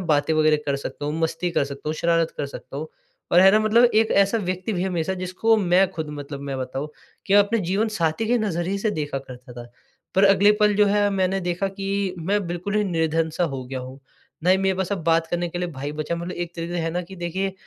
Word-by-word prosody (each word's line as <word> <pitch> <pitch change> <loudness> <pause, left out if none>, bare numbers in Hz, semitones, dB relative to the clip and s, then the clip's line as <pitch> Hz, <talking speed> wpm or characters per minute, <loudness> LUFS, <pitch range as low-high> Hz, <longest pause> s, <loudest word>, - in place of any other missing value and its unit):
बातें 150 0 +2
वग़ैरह 155 0 +4
कर 140 -1 +1
सकता 140 +1 -6
हूँ, 150 - -2
मस्ती 170 +2 -1
कर 155 - +1
सकता 140 +1 -7
हूँ, 155 - -1
शरारत 165 0 +1
कर 140 - -1
सकता 140 0 -9
हूँ। 155 +2 -5 0.4
और 175 - +7
है 190 - +8
ना 215 - +5
मतलब 220 +3 +4
एक 220 +1 +3
ऐसा 200 +3 +3
व्यक्ति 185 +1 -3
भी 180 -2 -1
है 190 - 0
मेरे 165 -3 -1
साथ 190 - -2
जिसको 185 +5 +1
मैं 185 -1 +3
ख़ुद 155 -3 -5
मतलब 140 0 -7
मैं 135 - -3
बताऊँ 130 +3 -4 0.4
कि 195 - +2
अपने 205 +3 +4
जीवनसाथी 195 0 0
के 245 - +3
नज़रिए 195 -2 -1
से 215 +1 0
देखा 145 -5 -3
करता 125 -2 -12
था। 120 0 -10 0.4
पर 195 +1 +5
अगले 200 +1 +6
पल 210 -1 +4
जो 210 - +5
है 205 0 +3
मैंने 190 0 0
देखा 180 +2 -1
कि 195 -1 -2
मैं 195 +3 -1
बिल्कुल 175 +4 -4
ही 210 - +2
निर्धन-सा 165 -1 0
हो 135 -5 -4
गया 130 +1 -5
हूँ। 130 +2 -10 0.4
ना 180 - +4
ही 185 - +6
मेरे 190 0 +1
पास 190 +1 -2
अब 185 - -3
बात 165 0 +3
करने 175 0 -2
के 175 - -5
लिए 180 0 -2
भाई 145 +1 -5
बचा। 155 +2 -3
मतलब 170 +2 -5
एक 175 0 -5
तरीके 170 +1 -4
से 175 - -2
है 165 0 -1
ना 180 +2 -2
कि 190 +2 -11
देखिए 185 +3 -2
175 Hz, 250 wpm, -23 LUFS, 155-195 Hz, 0.4 s, है